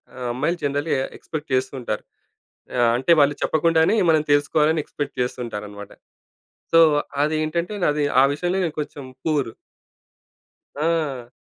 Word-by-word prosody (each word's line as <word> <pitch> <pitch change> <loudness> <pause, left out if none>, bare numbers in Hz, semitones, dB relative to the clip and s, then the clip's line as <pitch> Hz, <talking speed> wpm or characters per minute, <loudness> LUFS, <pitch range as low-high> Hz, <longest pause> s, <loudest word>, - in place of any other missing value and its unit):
ఆహ్, 125 -1 -5
అమ్మాయిలు 170 +8 -1
జనరల్‌గా 145 0 0 0.2
ఎక్స్‌పెక్ట్ 155 -2 -7
చేస్తుంటారు. 130 -1 -2 0.7
ఆహ్, 120 -1 +4
అంటే 135 +7 +2
వాళ్ళు 145 0 +4
చెప్పకుండానే 160 +5 +3
మనం 155 -1 +3
తెలుసుకోవాలని 150 +2 +2
ఎక్స్‌పెక్ట్ 145 -1 -5
చేస్తూ 125 +1 -2
ఉంటారన్నమాట. 105 -2 -8 0.8
సో, 165 - +7 0.4
అది 155 +1 0
ఏంటంటే 170 +6 -2 0.2
అది 145 0 -1 0.2
ఆ - - +6
విషయంలో 175 +5 -1
నేను 160 - -4
కొంచెం 145 -2 -6 0.2
పూరు. 145 -7 0 1.2
ఆ! 150 -6 -1
145 Hz, 125 wpm, -22 LUFS, 130-160 Hz, 1.2 s, సో